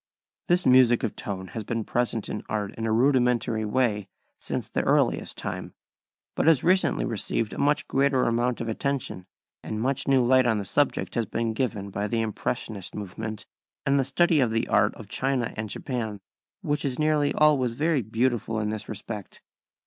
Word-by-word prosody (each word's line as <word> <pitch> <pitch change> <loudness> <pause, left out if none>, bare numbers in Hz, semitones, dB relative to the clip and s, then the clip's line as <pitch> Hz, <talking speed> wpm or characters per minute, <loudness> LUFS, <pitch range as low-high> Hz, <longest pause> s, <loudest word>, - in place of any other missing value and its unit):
This 175 +1 +2
music 125 -2 +5
of - - -2
tone 95 -2 -5
has 110 - -5
been 115 +1 -2
present 115 -1 -1
in 105 - -4
art 105 -1 -2
in 115 0 -3
a - - 0
rudimentary 120 -2 +2
way 105 -3 0 0.3
since - - -4
the - - -1
earliest - - +1
time, - - -5 0.6
but - - 0
has 160 -5 +5
recently 185 +1 +3
received 110 -1 -1
a - - -6
much 145 +1 +2
greater 135 -1 +2
amount 120 +1 0
of 115 - -3
attention, 115 -5 -3 0.4
and 110 - -4
much 135 +4 0
new 135 -3 +4
light 130 0 +4
on 110 -2 +2
the 100 - -3
subject 145 +9 0
has 115 -3 -1
been 115 +1 -1
given 105 -5 -2
by 100 +2 -2
the 115 +1 0
impressionist 110 -2 -3
movement 105 +2 -6 0.4
and 140 0 +3
the - - +3
study 160 +4 +3
of 125 -4 +3
the 115 0 0
art - - +3
of - - -11
China 130 -3 -1
and 110 -1 -4
Japan, 110 -4 -4 0.4
which 150 -5 -1
is 135 -3 -2
nearly 150 -1 +2
always 140 -6 +3
very 150 +2 +1
beautiful 115 0 -1
in 105 -1 -1
this 110 0 -5
respect. 105 -1 -7
120 Hz, 180 wpm, -26 LUFS, 110-135 Hz, 0.6 s, music